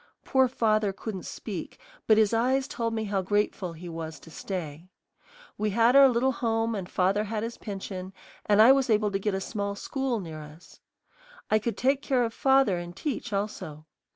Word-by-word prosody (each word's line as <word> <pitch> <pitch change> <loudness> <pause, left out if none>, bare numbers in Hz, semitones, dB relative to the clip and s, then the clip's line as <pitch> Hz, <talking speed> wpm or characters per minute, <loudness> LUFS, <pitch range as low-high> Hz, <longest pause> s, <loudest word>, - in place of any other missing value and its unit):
Poor 265 -1 +3
father 215 -4 +1
couldn't 195 -1 -6
speak, - - -6 0.3
but 220 - +6
his 220 0 +3
eyes 260 +4 +2
told 230 -3 -2
me 220 -1 -2
how 200 -2 -1
grateful 195 -2 -1
he 170 +2 -10
was 160 -1 -6
to 165 - -15
stay. 165 -2 -6 0.7
We 215 0 +1
had 230 +5 +3
our 275 -1 +8
little 250 +2 +2
home 230 -2 -1
and 190 -4 -5
father 195 +3 +1
had 215 0 -3
his 230 +1 -5
pension, 190 -2 -6 0.4
and 210 +1 +6
I 245 - +8
was 270 -1 +3
able 210 -1 +2
to 195 - -1
get 200 0 -1
a - - -1
small 200 0 -3
school 265 +2 -2
near 160 -5 -7
us. 150 +3 -14 0.7
I 215 - +5
could 220 -1 -3
take 270 +2 +2
care 260 -4 +1
of 230 -1 -2
father 265 -10 +3
and 175 0 -8
teach 275 +2 -4
also. 195 -7 -4
210 Hz, 190 wpm, -27 LUFS, 190-235 Hz, 0.7 s, our